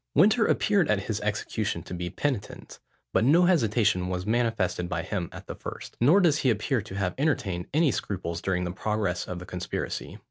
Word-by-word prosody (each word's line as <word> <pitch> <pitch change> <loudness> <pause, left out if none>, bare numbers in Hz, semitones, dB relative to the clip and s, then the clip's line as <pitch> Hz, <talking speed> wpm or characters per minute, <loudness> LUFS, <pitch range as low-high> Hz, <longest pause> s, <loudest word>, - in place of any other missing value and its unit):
Winter 215 - +5
appeared 200 -6 +2
at 105 -2 +2
his 105 +1 -3
execution 105 0 -2
to - - -8
be 90 0 -3
penitent; 135 -4 -4 0.3
but - - +3
no 165 +8 +5
hesitation 110 - +2
was 90 0 -3
manifested 110 -6 0
by 85 -2 -2
him 95 -3 -3
at - - -10
the - - -6
first; - - -8
nor 150 +11 +6
does 160 -6 +3
he 130 - +2
appear 115 +3 +1
to 100 -1 -9
have 95 -3 -1
entertained 100 - 0
any 155 0 +3
scruples 85 -6 -3
during 90 -2 0
the 90 - -2
progress 100 -2 -2
of 90 - -4
the 90 - -8
conspiracy. 90 -1 -4
105 Hz, 190 wpm, -27 LUFS, 90-140 Hz, 0.3 s, nor